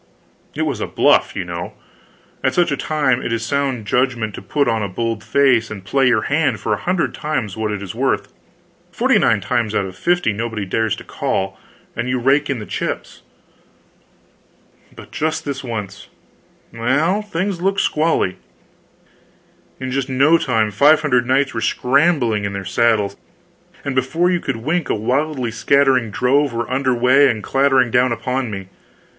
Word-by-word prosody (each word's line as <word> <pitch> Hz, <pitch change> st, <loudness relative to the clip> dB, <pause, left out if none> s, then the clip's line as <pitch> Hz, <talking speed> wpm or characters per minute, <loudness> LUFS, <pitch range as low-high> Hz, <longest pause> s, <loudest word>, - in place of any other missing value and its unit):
It -, -, -1 dB
was -, -, -2 dB
a -, -, -2 dB
"bluff" -, -, +2 dB
you -, -, -3 dB
know. -, -, -6 dB, 0.7 s
At -, -, +1 dB
such 175 Hz, -4 st, +2 dB
a -, -, +1 dB
time 135 Hz, -4 st, 0 dB
it -, -, -4 dB
is 115 Hz, -1 st, -1 dB
sound 135 Hz, -4 st, -1 dB
judgment 120 Hz, -2 st, 0 dB
to -, -, -8 dB
put 145 Hz, -2 st, 0 dB
on 110 Hz, -1 st, +1 dB
a 100 Hz, -, -2 dB
bold 115 Hz, +3 st, -3 dB
face 125 Hz, -4 st, +2 dB
and 100 Hz, -3 st, -8 dB
play 135 Hz, +5 st, +2 dB
your 120 Hz, -4 st, +2 dB
hand 150 Hz, +1 st, 0 dB
for -, -, -1 dB
a -, -, 0 dB
hundred 180 Hz, -1 st, -1 dB
times 130 Hz, -, -3 dB
what 110 Hz, -1 st, -2 dB
it 100 Hz, -1 st, -4 dB
is 95 Hz, -, -7 dB
worth; -, -, -1 dB, 0.6 s
forty -, -, +2 dB
nine -, -, +2 dB
times 110 Hz, -3 st, -1 dB
out 100 Hz, -, +1 dB
of 95 Hz, -1 st, -8 dB
fifty 175 Hz, -, +1 dB
nobody 110 Hz, -1 st, -3 dB
dares 110 Hz, +3 st, 0 dB
to -, -, -11 dB
"call," 95 Hz, 0 st, -2 dB, 0.4 s
and 125 Hz, +2 st, -3 dB
you 130 Hz, -, 0 dB
rake 135 Hz, +4 st, +2 dB
in 135 Hz, -, -1 dB
the 105 Hz, -, -7 dB
chips. -, -, -5 dB, 1.7 s
But -, -, -13 dB
just 155 Hz, +1 st, -2 dB
this 140 Hz, -2 st, -4 dB
once 105 Hz, -5 st, -6 dB, 0.7 s
well, 145 Hz, -, +1 dB
things 195 Hz, -2 st, -3 dB
looked 195 Hz, +2 st, +1 dB
squally! 155 Hz, -, +1 dB, 1.4 s
In 130 Hz, 0 st, -4 dB
just 135 Hz, 0 st, -2 dB
no 140 Hz, +6 st, +4 dB
time, 110 Hz, -6 st, 0 dB
five 145 Hz, +9 st, +5 dB
hundred 125 Hz, -5 st, +1 dB
knights 135 Hz, +1 st, +2 dB
were 115 Hz, -, -3 dB
scrambling 130 Hz, -6 st, +2 dB
into 100 Hz, 0 st, -3 dB
their 100 Hz, -, -6 dB
saddles, 105 Hz, 0 st, +1 dB, 0.7 s
and 140 Hz, -, -2 dB
before 130 Hz, +8 st, +1 dB
you 175 Hz, -, +1 dB
could 135 Hz, -7 st, -3 dB
wink 155 Hz, +7 st, -2 dB
a -, -, +1 dB
widely 130 Hz, +3 st, -1 dB
scattering 130 Hz, 0 st, +2 dB
drove 130 Hz, +5 st, +1 dB
were 120 Hz, 0 st, -2 dB
under 130 Hz, 0 st, +1 dB
way 130 Hz, +4 st, +5 dB
and 110 Hz, -2 st, -2 dB
clattering 135 Hz, -3 st, +2 dB
down 125 Hz, +1 st, +3 dB
upon 125 Hz, +2 st, -2 dB
me. 95 Hz, -2 st, -7 dB
125 Hz, 175 wpm, -19 LUFS, 110-140 Hz, 1.7 s, five